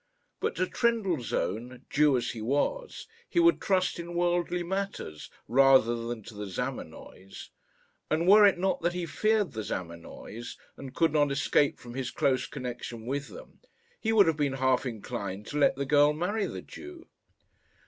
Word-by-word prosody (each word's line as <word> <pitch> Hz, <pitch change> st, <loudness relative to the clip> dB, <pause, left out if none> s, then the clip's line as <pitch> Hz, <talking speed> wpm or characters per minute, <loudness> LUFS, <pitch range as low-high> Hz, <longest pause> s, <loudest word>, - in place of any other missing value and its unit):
But -, -, -1 dB
to 185 Hz, -, +1 dB
Trendellsohn, 150 Hz, -, -1 dB
Jew 150 Hz, -2 st, +4 dB
as 120 Hz, -, -2 dB
he 115 Hz, -, -7 dB
was, 145 Hz, -, -2 dB, 0.2 s
he -, -, +1 dB
would 340 Hz, 0 st, +4 dB
trust 185 Hz, -2 st, +1 dB
in 170 Hz, 0 st, -6 dB
worldly 175 Hz, 0 st, 0 dB
matters, 190 Hz, -, -4 dB, 0.2 s
rather 130 Hz, -1 st, +5 dB
than 120 Hz, -2 st, -5 dB
to 115 Hz, -, -11 dB
the 105 Hz, 0 st, -6 dB
Zamenoys; 95 Hz, +1 st, -7 dB, 0.6 s
and 160 Hz, +3 st, +1 dB
were 210 Hz, +2 st, +8 dB
it 200 Hz, -3 st, +6 dB
not 190 Hz, +1 st, 0 dB
that 170 Hz, +1 st, 0 dB
he 180 Hz, -1 st, -3 dB
feared 215 Hz, +2 st, +1 dB
the 110 Hz, -, -4 dB
Zamenoys, 95 Hz, +5 st, -7 dB, 0.2 s
and 135 Hz, -1 st, -10 dB
could 165 Hz, -3 st, +2 dB
not 145 Hz, -2 st, +3 dB
escape 140 Hz, +1 st, +2 dB
from 120 Hz, 0 st, -11 dB
his 130 Hz, 0 st, -3 dB
close 130 Hz, 0 st, 0 dB
connection 120 Hz, -2 st, -6 dB
with 140 Hz, +3 st, -3 dB
them, -, -, -13 dB, 0.4 s
he 220 Hz, -, 0 dB
would 215 Hz, -3 st, +6 dB
have 165 Hz, -2 st, +1 dB
been 145 Hz, -3 st, 0 dB
half 130 Hz, 0 st, +1 dB
inclined 100 Hz, -3 st, -5 dB
to 150 Hz, -, -4 dB
let 145 Hz, -, +4 dB
the 140 Hz, +1 st, -3 dB
girl 145 Hz, +1 st, +4 dB
marry 200 Hz, +7 st, -1 dB
the -, -, -7 dB
Jew. 355 Hz, -1 st, -11 dB
145 Hz, 170 wpm, -28 LUFS, 120-180 Hz, 0.6 s, were